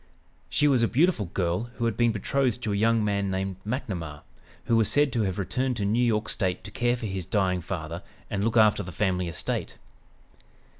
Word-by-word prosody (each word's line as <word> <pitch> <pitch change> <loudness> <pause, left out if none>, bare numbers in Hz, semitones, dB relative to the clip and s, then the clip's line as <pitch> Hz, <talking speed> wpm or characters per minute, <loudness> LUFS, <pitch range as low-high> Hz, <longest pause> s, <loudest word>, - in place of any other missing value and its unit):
She 150 - +3
was 130 -4 +4
a 115 - +4
beautiful 140 - +2
girl 90 +6 -1
who 120 - -2
had 115 -2 0
been 120 0 +3
betrothed 125 +3 0
to 105 - 0
a - - 0
young 110 +1 +3
man 100 -1 0
named 95 0 -2
McNamar, 90 - -4 0.4
who 115 - +2
was 110 -2 +3
said 145 -2 +3
to 115 - +1
have 95 -2 -1
returned 125 +6 -1
to 100 - -1
New 115 +5 +2
York 110 -2 +1
State 95 -4 -1
to - - -8
care 120 0 +1
for 115 - -5
his 95 -4 -4
dying 95 -3 +1
father 85 -1 -5 0.3
and 100 -1 -2
look 115 +1 +1
after 110 -2 +5
the 90 -2 -7
family 90 -1 0
estate. 85 - -3
105 Hz, 205 wpm, -27 LUFS, 95-120 Hz, 0.4 s, after